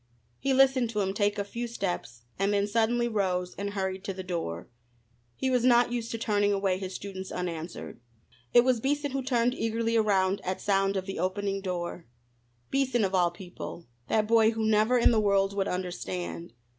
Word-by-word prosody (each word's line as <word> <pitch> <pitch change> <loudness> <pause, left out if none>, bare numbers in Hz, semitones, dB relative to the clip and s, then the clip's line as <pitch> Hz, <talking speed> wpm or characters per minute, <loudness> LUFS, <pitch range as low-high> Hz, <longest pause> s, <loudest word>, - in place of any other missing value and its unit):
He 275 - 0
listened 265 -2 +4
to 210 -2 -1
him 195 0 -1
take 205 0 +1
a 200 - 0
few 235 +4 -5
steps, 175 - -4 0.2
and 195 +1 +2
then 200 0 +2
suddenly 230 +3 +1
rose 185 -5 -1
and 200 0 -4
hurried 190 -1 -2
to 195 - -3
the 190 - -5
door. 165 - -4 0.7
He 260 - -1
was 250 -2 +2
not 245 -1 +5
used 235 -1 -3
to 230 - -3
turning 205 -2 +1
away 195 -2 +1
his 190 -1 -5
students 190 -1 -6
unanswered. 170 -5 -5 0.5
It 240 - +7
was 255 -2 +2
Beason 285 +3 -1
who 270 0 -1
turned 245 -2 +1
eagerly 230 -1 -1
around 200 -3 +2
at 185 0 -2
sound 195 -1 +1
of 190 - -3
the 195 - -5
opening 195 +1 -1
door. 175 -2 -4 0.6
Beason 260 -5 +2
of 190 - -3
all 180 -2 +4
people 175 -1 -9 0.2
that 215 -1 +2
boy 225 -1 +5
who 220 0 -1
never 220 +3 +3
in 240 - +5
the 220 -2 +3
world 200 -1 +2
would 195 -1 0
understand! 180 -2 -4
205 Hz, 190 wpm, -28 LUFS, 185-230 Hz, 0.7 s, It